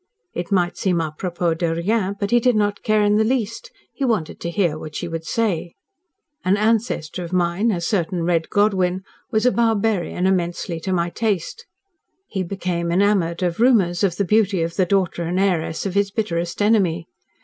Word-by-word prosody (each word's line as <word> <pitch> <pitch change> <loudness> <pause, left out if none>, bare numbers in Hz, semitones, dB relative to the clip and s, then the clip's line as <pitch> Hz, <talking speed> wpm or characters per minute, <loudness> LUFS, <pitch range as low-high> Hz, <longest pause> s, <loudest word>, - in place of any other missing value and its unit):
It 175 +1 -5
might 180 -3 +1
seem 180 -3 +1
a 155 -2 -2
propos 175 -1 -1
de 165 -2 0
rien, 200 +3 0
but 200 +1 -2
he 240 - +5
did 245 0 +2
not 205 -1 0
care 215 -1 +2
in 205 0 +3
the 220 - +4
least. 250 - -2 0.2
He 280 - -4
wanted 215 -11 -1
to 170 - -4
hear 170 -3 +1
what 155 -1 -8
she 175 - -3
would 165 -1 -5
say. 180 -4 -1 0.7
"An 190 +2 +2
ancestor 210 -6 0
of 170 - -7
mine 180 +4 +1
a 190 -6 0
certain 170 -1 -1
Red 165 -1 0
Godwyn 190 -3 +1 0.3
was 220 -1 +1
a 250 - +5
barbarian 220 -6 +1
immensely 175 -2 -1
to 190 +4 -4
my 175 -1 0
taste. 220 - -2 0.6
He 195 - -4
became 175 -2 -2
enamoured 185 -2 +2
of 175 +1 -1
rumours 210 -8 +3
of 185 -4 +2
the 200 - 0
beauty 200 -3 +2
of 165 0 -4
the 185 -2 +2
daughter 185 -2 +1
and 175 +2 -1
heiress 175 -4 0
of 195 - -2
his 200 0 +2
bitterest 175 -3 -2
enemy. 185 -6 +2
185 Hz, 190 wpm, -21 LUFS, 170-210 Hz, 0.7 s, he